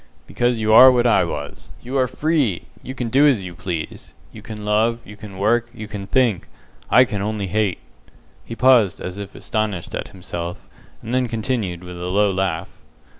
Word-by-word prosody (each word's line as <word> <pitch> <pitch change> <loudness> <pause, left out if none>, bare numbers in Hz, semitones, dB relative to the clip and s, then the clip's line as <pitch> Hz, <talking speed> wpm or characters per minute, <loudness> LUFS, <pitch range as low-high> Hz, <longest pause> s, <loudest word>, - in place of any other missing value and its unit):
"Because 120 -1 0
you 110 0 +2
are 130 +3 +10
what 125 -1 +2
I 120 - +4
was. - - -6
You 125 +3 -6
are 130 - +2
FREE! 145 - 0 0.2
You 130 - -8
can 120 -3 -3
do 140 +5 +5
as 120 -9 +2
you 90 - -7
please. 85 -1 -6 0.2
You - - -11
can 105 -2 -8
love, 110 +3 +2
you 105 - -11
can 105 -3 -11
work, 120 +4 +1
you 110 - -7
can 100 -2 -7
think. 115 -4 +1 0.4
I 125 - +6
can 105 -4 -4
only 105 0 -2
hate!" 100 0 0 0.7
He 115 - -8
paused 120 -7 +4
as 90 +2 -6
if 100 -1 -8
astonished 105 -5 -3
at - - -4
himself, 90 -2 -7 0.4
and 115 - -5
then 130 -1 +1
continued, 110 -6 -3
with 90 0 -9
a - - -4
low 100 +2 +2
laugh. 95 -2 -2
110 Hz, 190 wpm, -21 LUFS, 95-120 Hz, 0.7 s, are